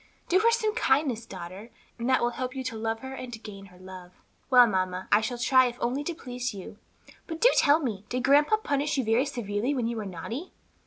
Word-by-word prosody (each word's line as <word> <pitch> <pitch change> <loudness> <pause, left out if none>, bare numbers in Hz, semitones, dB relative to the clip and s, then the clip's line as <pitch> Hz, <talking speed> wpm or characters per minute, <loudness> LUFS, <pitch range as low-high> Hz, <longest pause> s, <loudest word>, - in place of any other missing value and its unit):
Do 370 - +4
her 455 +3 +4
some 440 -2 +1
kindness, 265 - +1
daughter, 185 +6 -9 0.3
and 235 +2 -2
that 260 - +3
will 240 - +1
help 255 +2 -5
you 265 - -4
to 255 -3 -4
love 225 0 -3
her 265 0 -7
and 255 -2 -7
to - - -5
gain 200 -3 -10
her 180 -1 -18
love." 185 -1 -11 0.4
"Well, 250 -2 +8
mamma, 185 -3 -2
I 210 - +5
shall 240 +3 -3
try 255 +1 +4
if 240 0 -6
only 260 +4 -1
to 340 - -3
please 250 -6 -5
you. 195 +2 -10 0.5
But 325 0 -6
do - - +6
tell 290 +1 +5
me, 220 - -3
did 250 0 -2
grandpa 295 +10 +4
punish 290 -7 -1
you 265 - +1
very 230 +5 +2
severely 230 +3 -2
when 245 -3 -1
you 235 0 -2
were 215 - -4
naughty?" 225 - -6
245 Hz, 230 wpm, -27 LUFS, 210-275 Hz, 0.5 s, Well